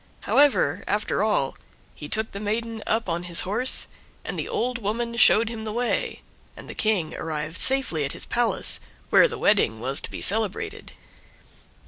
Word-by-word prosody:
However, 290 Hz, 0 st, +3 dB
after 210 Hz, -1 st, 0 dB
all, 210 Hz, -11 st, +1 dB, 0.4 s
he 150 Hz, -, -9 dB
took 220 Hz, 0 st, 0 dB
the 200 Hz, -, -6 dB
maiden 220 Hz, +2 st, -3 dB
up 225 Hz, 0 st, 0 dB
on 170 Hz, 0 st, -2 dB
his 170 Hz, -, +3 dB
horse, 225 Hz, +8 st, +2 dB, 0.4 s
and -, -, -3 dB
the -, -, -4 dB
old 250 Hz, +1 st, -1 dB
woman 235 Hz, +2 st, -3 dB
showed 230 Hz, -1 st, +5 dB
him 225 Hz, -1 st, -5 dB
the 215 Hz, -, -4 dB
way, 240 Hz, +2 st, -2 dB, 0.3 s
and -, -, -11 dB
the -, -, -7 dB
King 205 Hz, -8 st, 0 dB
arrived 155 Hz, +1 st, -4 dB
safely 265 Hz, -, +1 dB
at 140 Hz, -, -2 dB
his -, -, -5 dB
palace, 240 Hz, -1 st, +1 dB, 0.3 s
where -, -, +7 dB
the 460 Hz, -1 st, -6 dB
wedding 155 Hz, -, +2 dB
was 130 Hz, +4 st, 0 dB
to -, -, -3 dB
be -, -, -7 dB
celebrated. 210 Hz, -1 st, 0 dB
215 Hz, 170 wpm, -24 LUFS, 175-235 Hz, 0.4 s, where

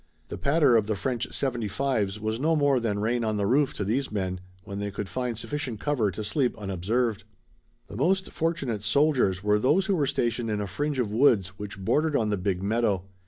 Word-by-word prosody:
The -, -, -5 dB
patter 140 Hz, -3 st, +4 dB
of 105 Hz, -2 st, +1 dB
the 110 Hz, -, 0 dB
French 125 Hz, +3 st, -2 dB
seventy 120 Hz, -5 st, -2 dB
fives 105 Hz, -4 st, -1 dB
was 110 Hz, +1 st, -2 dB
no 160 Hz, +4 st, +2 dB
more 145 Hz, -3 st, +3 dB
than 110 Hz, -4 st, -1 dB
rain 115 Hz, +3 st, 0 dB
on 110 Hz, -1 st, 0 dB
the 100 Hz, -, 0 dB
roof 135 Hz, +6 st, +3 dB
to -, -, -2 dB
these 120 Hz, +7 st, -1 dB
men 95 Hz, -3 st, -2 dB, 0.2 s
when 100 Hz, 0 st, -6 dB
they 100 Hz, 0 st, -2 dB
could 100 Hz, 0 st, -5 dB
find 125 Hz, 0 st, -3 dB
sufficient 135 Hz, -3 st, -4 dB
cover 130 Hz, -7 st, +1 dB
to 100 Hz, +4 st, -5 dB
sleep 125 Hz, +4 st, 0 dB
unobserved. 105 Hz, +3 st, -1 dB, 0.6 s
The -, -, -10 dB
most 190 Hz, +8 st, +1 dB
fortunate 140 Hz, -10 st, -1 dB
soldiers 110 Hz, -5 st, +2 dB
were 105 Hz, 0 st, +3 dB
those 155 Hz, -, +3 dB
who 195 Hz, -, +1 dB
were 145 Hz, -5 st, +1 dB
stationed 120 Hz, -3 st, -1 dB
in 105 Hz, -1 st, -1 dB
a 105 Hz, -, -2 dB
fringe 145 Hz, +9 st, -2 dB
of 120 Hz, -5 st, 0 dB
woods 110 Hz, -5 st, +4 dB
which 105 Hz, 0 st, -6 dB
bordered 150 Hz, +10 st, +1 dB
on 110 Hz, -4 st, +1 dB
the 105 Hz, -, +1 dB
big 95 Hz, -1 st, -1 dB
meadow. 105 Hz, -3 st, +1 dB
115 Hz, 210 wpm, -27 LUFS, 105-140 Hz, 0.6 s, patter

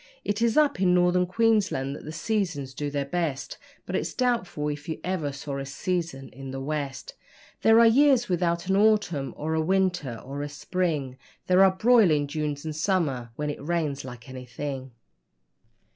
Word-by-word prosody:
It 205 Hz, +2 st, -1 dB
is 230 Hz, +1 st, +2 dB
up 295 Hz, -10 st, +3 dB
in 180 Hz, -1 st, +4 dB
Northern 180 Hz, 0 st, +3 dB
Queensland 200 Hz, -10 st, +1 dB
that -, -, -10 dB
the 155 Hz, -, -6 dB
seasons 160 Hz, -6 st, -2 dB
do 145 Hz, +2 st, -3 dB
their 140 Hz, -1 st, -2 dB
best, 150 Hz, -3 st, -3 dB, 0.3 s
But -, -, -4 dB
it's -, -, -2 dB
doubtful 230 Hz, -12 st, 0 dB
if 145 Hz, +1 st, -6 dB
you 160 Hz, -, -3 dB
ever 180 Hz, -6 st, -2 dB
saw 140 Hz, 0 st, -5 dB
a 135 Hz, -, -4 dB
season 140 Hz, -2 st, -3 dB
in 135 Hz, +1 st, -9 dB
the 135 Hz, 0 st, -5 dB
West; 140 Hz, -1 st, -4 dB, 0.5 s
There 225 Hz, +1 st, +6 dB
are 235 Hz, -, +7 dB
years 255 Hz, +1 st, +5 dB
without 170 Hz, -1 st, 0 dB
an 190 Hz, +1 st, +1 dB
autumn 200 Hz, -9 st, +2 dB
or 160 Hz, +1 st, -2 dB
a 160 Hz, -, +1 dB
winter 180 Hz, -8 st, 0 dB
or 140 Hz, +2 st, -5 dB
a 145 Hz, -, -4 dB
spring, 145 Hz, -4 st, -2 dB, 0.3 s
There 185 Hz, +1 st, +5 dB
are 195 Hz, -, +7 dB
broiling 190 Hz, -7 st, +4 dB
Junes, 150 Hz, 0 st, -3 dB
and 155 Hz, -1 st, -4 dB
summers 155 Hz, -, 0 dB
when 150 Hz, +2 st, -2 dB
it 145 Hz, -, -8 dB
rains 150 Hz, -4 st, -1 dB
like 125 Hz, -1 st, -10 dB
anything. 130 Hz, +1 st, -6 dB
155 Hz, 175 wpm, -26 LUFS, 140-190 Hz, 0.5 s, are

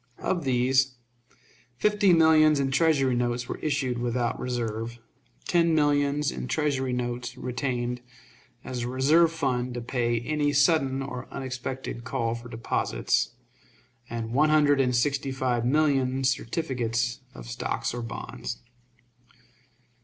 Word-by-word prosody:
Of 175 Hz, -5 st, -2 dB
these, 130 Hz, +1 st, +2 dB, 0.8 s
fifty 210 Hz, +3 st, +3 dB
millions 155 Hz, -2 st, +5 dB
in 135 Hz, -1 st, 0 dB
Treasury 135 Hz, -2 st, +3 dB
notes 120 Hz, 0 st, -1 dB
were -, -, -5 dB
issued 135 Hz, -5 st, -1 dB
without 120 Hz, 0 st, -1 dB
reserve, 115 Hz, -2 st, -3 dB, 0.5 s
ten 170 Hz, -2 st, +3 dB
millions 145 Hz, -1 st, +2 dB
in -, -, -5 dB
Treasury 140 Hz, -4 st, 0 dB
notes 125 Hz, 0 st, -3 dB
retained 125 Hz, -1 st, -2 dB, 0.6 s
as 125 Hz, -1 st, -4 dB
a 120 Hz, -, -2 dB
reserve 150 Hz, +7 st, +4 dB
fund 125 Hz, -6 st, -1 dB
to 120 Hz, -, -3 dB
pay 120 Hz, -1 st, 0 dB
any 145 Hz, +2 st, 0 dB
sudden 140 Hz, -2 st, +3 dB
or 125 Hz, -2 st, -6 dB
unexpected 130 Hz, -2 st, -5 dB
call 115 Hz, -1 st, -1 dB
for 120 Hz, +1 st, -8 dB
deposits, 115 Hz, 0 st, -1 dB, 0.7 s
and 115 Hz, 0 st, -4 dB
one 150 Hz, +4 st, +4 dB
hundred 145 Hz, -2 st, +4 dB
and 125 Hz, -2 st, +1 dB
sixty 140 Hz, +2 st, 0 dB
five 125 Hz, -3 st, 0 dB
millions 135 Hz, -2 st, +2 dB
certificates 120 Hz, -4 st, -2 dB, 0.2 s
of -, -, -9 dB
stock -, -, -4 dB
or 120 Hz, -, -4 dB
bonds. 115 Hz, -1 st, -6 dB
130 Hz, 125 wpm, -27 LUFS, 120-145 Hz, 0.8 s, millions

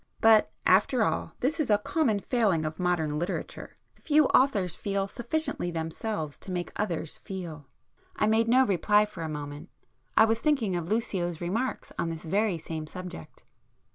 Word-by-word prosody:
But 220 Hz, -1 st, +5 dB
after 210 Hz, +6 st, +4 dB
all -, -, -1 dB
this 305 Hz, +6 st, 0 dB
is 300 Hz, -, 0 dB
a 210 Hz, -, +5 dB
common 230 Hz, 0 st, +1 dB
failing 200 Hz, -, +1 dB
of 155 Hz, +2 st, -4 dB
modern 160 Hz, -4 st, 0 dB
literature; 175 Hz, +3 st, -5 dB, 0.2 s
few 305 Hz, -1 st, +3 dB
authors 205 Hz, -, +3 dB
feel 195 Hz, -1 st, -2 dB
sufficiently 255 Hz, -, -2 dB
themselves 160 Hz, -1 st, -4 dB
to -, -, -10 dB
make 175 Hz, -1 st, -3 dB
others 170 Hz, -6 st, -3 dB
feel." 165 Hz, -7 st, -7 dB, 0.5 s
I -, -, +1 dB
made 220 Hz, +1 st, +3 dB
no 255 Hz, +3 st, +5 dB
reply 210 Hz, +1 st, +3 dB
for 210 Hz, -5 st, -10 dB
a 160 Hz, -, -3 dB
moment. 145 Hz, -1 st, -6 dB, 0.5 s
I 220 Hz, -, +8 dB
was 225 Hz, 0 st, +1 dB
thinking 250 Hz, -, +1 dB
of 170 Hz, -1 st, -3 dB
Lucio's 190 Hz, -7 st, -1 dB
remarks 220 Hz, +9 st, -3 dB
on 170 Hz, -, 0 dB
this 165 Hz, -1 st, -6 dB
very 195 Hz, +2 st, +1 dB
same 160 Hz, -1 st, -6 dB
subject. 180 Hz, -, -9 dB
195 Hz, 165 wpm, -28 LUFS, 165-225 Hz, 0.5 s, I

